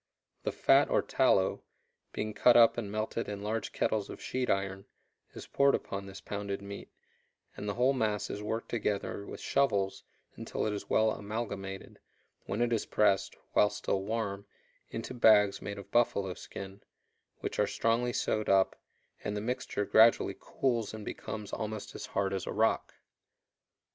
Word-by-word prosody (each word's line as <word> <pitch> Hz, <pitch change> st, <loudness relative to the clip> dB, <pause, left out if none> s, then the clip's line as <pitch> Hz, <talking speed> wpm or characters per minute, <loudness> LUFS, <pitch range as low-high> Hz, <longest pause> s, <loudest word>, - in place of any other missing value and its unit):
The -, -, -1 dB
fat -, -, +4 dB
or -, -, +2 dB
tallow, -, -, +2 dB, 0.5 s
being 110 Hz, 0 st, -3 dB
cut 120 Hz, +3 st, +6 dB
up 115 Hz, -1 st, +7 dB
and 105 Hz, -4 st, -4 dB
melted 110 Hz, +2 st, -2 dB
in 100 Hz, -1 st, -5 dB
large 110 Hz, -1 st, -2 dB
kettles 105 Hz, -2 st, 0 dB
of -, -, -8 dB
sheet 130 Hz, -1 st, -2 dB
iron, 95 Hz, 0 st, -1 dB, 0.5 s
is -, -, -8 dB
poured 140 Hz, 0 st, +3 dB
upon 100 Hz, 0 st, -5 dB
this 95 Hz, 0 st, -9 dB
pounded 100 Hz, 0 st, -4 dB
meat, 100 Hz, 0 st, -8 dB, 0.7 s
and 105 Hz, -, -5 dB
the 100 Hz, -, -2 dB
whole 125 Hz, +3 st, +3 dB
mass 110 Hz, -5 st, 0 dB
is 105 Hz, -, -5 dB
worked 110 Hz, +2 st, -3 dB
together 100 Hz, -2 st, -2 dB
with -, -, -7 dB
shovels 100 Hz, -8 st, +1 dB, 0.3 s
until -, -, -3 dB
it 105 Hz, -, 0 dB
is 105 Hz, -, -6 dB
well 110 Hz, 0 st, +4 dB
amalgamated, 100 Hz, -3 st, -5 dB, 0.5 s
when 105 Hz, +5 st, 0 dB
it 120 Hz, 0 st, +1 dB
is 110 Hz, -, -1 dB
pressed, 100 Hz, -2 st, +2 dB, 0.2 s
while 105 Hz, -, +5 dB
still 105 Hz, -1 st, -2 dB
warm, 100 Hz, -1 st, -3 dB, 0.4 s
into 115 Hz, +2 st, -5 dB
bags 105 Hz, -4 st, +5 dB
made 100 Hz, 0 st, -5 dB
of 100 Hz, -, -10 dB
buffalo 100 Hz, -5 st, +2 dB
skin, 95 Hz, +2 st, -9 dB, 0.6 s
which -, -, -4 dB
are -, -, +3 dB
strongly 115 Hz, +2 st, +1 dB
sewed 110 Hz, -2 st, -1 dB
up, 95 Hz, -1 st, +4 dB, 0.5 s
and 105 Hz, 0 st, -2 dB
the -, -, 0 dB
mixture 115 Hz, -2 st, -2 dB
gradually 115 Hz, +3 st, +5 dB
cools 115 Hz, -5 st, -1 dB
and 105 Hz, -1 st, -8 dB
becomes 105 Hz, -2 st, -6 dB
almost 110 Hz, -1 st, -4 dB
as -, -, -7 dB
hard 100 Hz, 0 st, -1 dB
as 95 Hz, -, -3 dB
a -, -, -2 dB
rock. -, -, +1 dB
105 Hz, 165 wpm, -31 LUFS, 100-115 Hz, 0.7 s, up